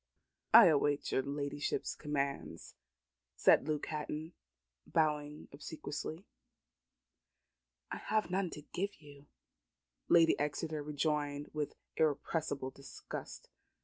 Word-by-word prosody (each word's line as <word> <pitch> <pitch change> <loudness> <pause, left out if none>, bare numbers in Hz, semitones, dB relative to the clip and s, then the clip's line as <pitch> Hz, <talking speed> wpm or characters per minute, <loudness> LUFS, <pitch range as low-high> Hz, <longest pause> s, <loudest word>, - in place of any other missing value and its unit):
"I 230 -1 +11
await 145 -3 +3
your - - +2
ladyship's 145 +1 -2
commands," 140 -2 -3 0.6
said - - +5
Luke 150 -1 -1
Hatton, 155 +2 -4 0.5
bowing 150 -2 0
obsequiously. 155 +4 -6 1.7
"I - - -2
have 215 -4 0
none 185 -1 +1
to 150 - -9
give 200 +6 -4
you," 145 -1 -15 0.8
Lady 165 -1 +5
Exeter 150 +1 -2
rejoined 145 -1 -1
with 150 -1 -2 0.2
irrepressible 145 -2 0
disgust. 140 0 -9
150 Hz, 95 wpm, -34 LUFS, 145-160 Hz, 1.7 s, I